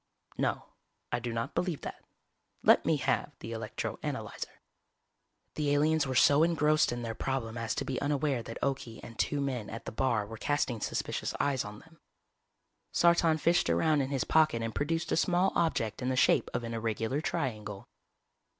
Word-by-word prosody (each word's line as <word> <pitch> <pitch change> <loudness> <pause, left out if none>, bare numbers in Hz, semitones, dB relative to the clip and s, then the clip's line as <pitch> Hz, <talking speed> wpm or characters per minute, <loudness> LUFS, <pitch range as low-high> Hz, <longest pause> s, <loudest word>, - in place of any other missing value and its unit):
_" - - -22
"No, - - 0 0.5
I - - 0
do 120 0 -4
not 115 0 -3
believe 175 -5 -1
that. - - -7 0.6
Let - - +5
me 160 -2 +3
have 145 +1 0
the 115 - -8
electro 110 -1 -4
analyzer." - - -5 0.9
The 145 -2 +1
aliens 155 0 +3
were 130 - -2
so 145 +4 +6
engrossed 155 -2 +3
in 120 0 -4
their 115 -1 -3
problem 120 -2 -3
as 115 -3 -2
to - - -2
be 130 - -3
unaware 145 -3 0
that 115 0 -7
Okie 130 -4 -2
and 115 - -11
two 145 - +1
men 130 -6 -2
at 115 - -7
the - - -4
bar 110 -2 +1
were 110 +2 -8
casting 125 -3 -1
suspicious - - -2
eyes 135 -3 +1
on 105 0 -8
them. 160 0 -20 0.9
Sartan 170 -2 +4
fished 170 - +3
around 145 - +3
in 135 - -2
his 135 -2 0
pocket 155 -8 +3
and 115 -1 -3
produced 165 +6 -1
a - - +3
small 180 +2 +3
object 115 -10 0
in 125 - -1
the 130 - +1
shape - - +3
of 120 - -2
an 115 0 -4
irregular 115 +4 -1
triangle. 110 - -3
130 Hz, 185 wpm, -31 LUFS, 115-155 Hz, 0.9 s, so